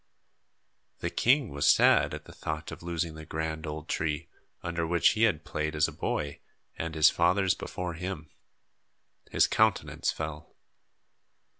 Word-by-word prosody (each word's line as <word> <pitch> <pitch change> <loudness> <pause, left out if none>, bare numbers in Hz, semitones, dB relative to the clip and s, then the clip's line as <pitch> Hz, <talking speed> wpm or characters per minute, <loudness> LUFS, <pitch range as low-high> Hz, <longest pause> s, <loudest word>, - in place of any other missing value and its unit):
The - - -2
king 130 -1 +3
was 70 0 0
sad - - +5
at - - -10
the - - -12
thought 75 0 -5
of - - -9
losing 85 -1 -2
the 80 0 -9
grand 80 0 -4
old 75 +1 -6
tree, 80 +1 -2 0.3
under 85 -1 -2
which 85 +1 +4
he 110 +1 +3
had 80 -8 0
played 75 0 -2
as 75 - +3
a - - -6
boy 70 -1 -3 0.4
and 80 0 -4
his 80 -1 +6
fathers 95 +2 +3
before 90 -1 -5
him. 80 -2 -6 1.0
His - - +4
countenance 110 -2 +1
fell. 80 +1 -6
80 Hz, 150 wpm, -29 LUFS, 75-90 Hz, 1.0 s, his